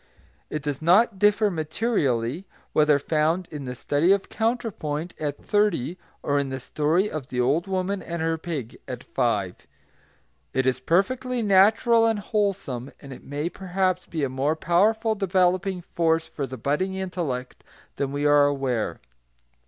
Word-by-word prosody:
It 150 -1 -4
does 145 -1 -3
not 190 +5 +4
differ 210 +1 +4
materially, 155 - -1 0.3
whether 150 -1 +4
found 160 +4 0
in 145 -3 -6
the 125 0 -5
study 145 +8 +2
of 200 0 +1
counterpoint, 195 -9 -2
at 145 -2 -4
thirty, 190 -6 +1 0.2
or 145 0 +1
in 140 -1 -2
the 130 0 -4
story 155 +9 +1
of 155 -9 -5
the 125 - -4
old 145 +9 +2
woman 190 +1 -1
and 170 0 -5
her 160 0 0
pig, 150 -9 -5
at - - -6
five. - - -1 0.9
It 130 0 +2
is 130 -1 +1
perfectly 240 - 0
natural 220 +4 +5
and 225 -1 +1
wholesome, 195 - -2
and 140 -2 -10
it - - -12
may 145 +3 -3
perhaps 185 0 -1
be 160 -3 -3
a - - +2
more 135 +4 0
powerful 215 +8 +2
developing 185 -2 +1
force 165 -1 +1
for 145 -4 -5
the 130 - -7
budding 150 +10 -1
intellect 170 -10 -4 0.3
than 140 -1 -1
we 145 +1 -2
are 145 -1 +6
aware. 135 -5 -1
165 Hz, 155 wpm, -25 LUFS, 145-195 Hz, 0.9 s, are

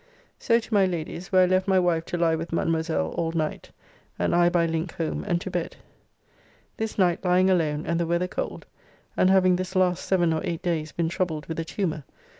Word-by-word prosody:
So 230 - +3
to 230 -1 -5
my 195 -2 +4
Lady's, 175 0 -5
where 185 -1 +6
I - - +5
left 185 +1 +1
my 190 -1 +3
wife 175 -3 +1
to 175 - -3
lie 170 -1 +2
with 165 +1 -5
Mademoiselle 160 - 0
all 165 -1 -2
night, 155 -2 -3 0.5
and - - 0
I 175 0 +4
by 175 -1 +2
link 165 +1 -2
home 165 -2 -3
and 175 -3 +1
to 190 - -6
bed. 175 -2 -3 1.0
This 220 -1 -4
night 180 -4 +2
lying 185 +1 +3
alone, 155 -4 0
and 170 0 0
the 170 - 0
weather 170 +2 0
cold, - - -5 0.5
and 185 - +3
having 185 -1 +4
this 185 +1 -5
last 180 -2 +2
7 175 -4 +2
or 160 - -1
8 170 +1 -3
days 160 -4 -1
been 170 -1 -1
troubled 170 -4 -2
with 165 0 -5
a 165 - -2
tumor... 160 -4 -3
175 Hz, 215 wpm, -25 LUFS, 165-185 Hz, 1.0 s, where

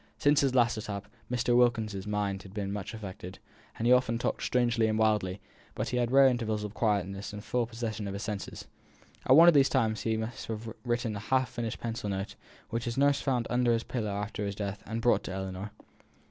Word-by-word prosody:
Since 145 +1 +4
his 135 -2 +1
last 120 -2 +3
attack, 105 -2 -4 0.3
Mr. 120 0 +2
Wilkins's 110 -5 +2
mind 100 -2 -1
had 95 +1 -13
been 100 -1 -2
much 105 +2 -5
affected; 100 -2 -8 0.4
he 120 +2 +3
often 125 -2 +4
talked 120 - -2
strangely 120 -2 +2
and 110 0 0
wildly; 105 -4 +1 0.4
but - - -2
he 125 - -1
had 120 -1 +1
rare 135 +2 +6
intervals 115 -5 +1
of 105 -1 -5
quietness 100 -3 -1
and 105 0 -7
full 120 -1 0
possession 110 -3 -4
of 100 - -4
his 100 - -5
senses. 105 -3 -5 0.6
At 130 - +7
one 165 +3 +9
of 175 - +8
these 140 -2 +5
times 110 -1 +1
he 110 -1 0
must 110 +2 -5
have 110 0 -5
written 120 -2 -1
a - - -4
half 130 +3 +1
finished 120 -2 -4
pencil 115 -3 -4
note, 95 0 -3 0.4
which 115 0 -2
his 120 0 -3
nurse 140 0 +3
found 125 -4 0
under 120 -1 +3
his 115 0 0
pillow 115 -4 -3
after 105 +1 -3
his 100 -1 -3
death, 100 -1 -4
and 115 0 -3
brought 120 - +4
to - - -5
Ellinor. 95 +1 -5
110 Hz, 215 wpm, -30 LUFS, 105-120 Hz, 0.6 s, one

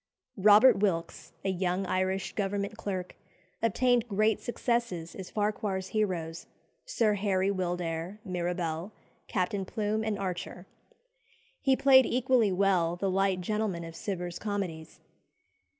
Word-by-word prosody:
Robert 210 +4 +7
Wilkes, 170 -5 -1
a - - +2
young 185 0 -1
Irish 185 +1 -1
Government 200 +1 -2
clerk, 185 -4 -4 0.5
obtained 240 +1 +2
great 215 +1 +1
successes 235 -9 -2
as 190 -2 -8
Farquhar's 205 -3 -2
heroes, 175 -6 -2 0.4
Sir 225 - +2
Harry 195 -1 +1
Wildair, 175 -1 -3
Mirabel, 175 0 -3 0.3
Captain 190 +2 -1
Plume, 215 +2 -2
and 215 -2 -1
Archer. 180 -1 -5 1.0
He 270 -2 +3
played 265 -1 +6
equally 250 -4 +2
well 180 -3 +2
the 190 +2 -1
light 190 -1 +1
gentlemen 210 -3 -2
of 165 0 -9
Cibber's 175 -2 -4
comedies. 185 -7 -4
195 Hz, 120 wpm, -29 LUFS, 180-215 Hz, 1.0 s, Robert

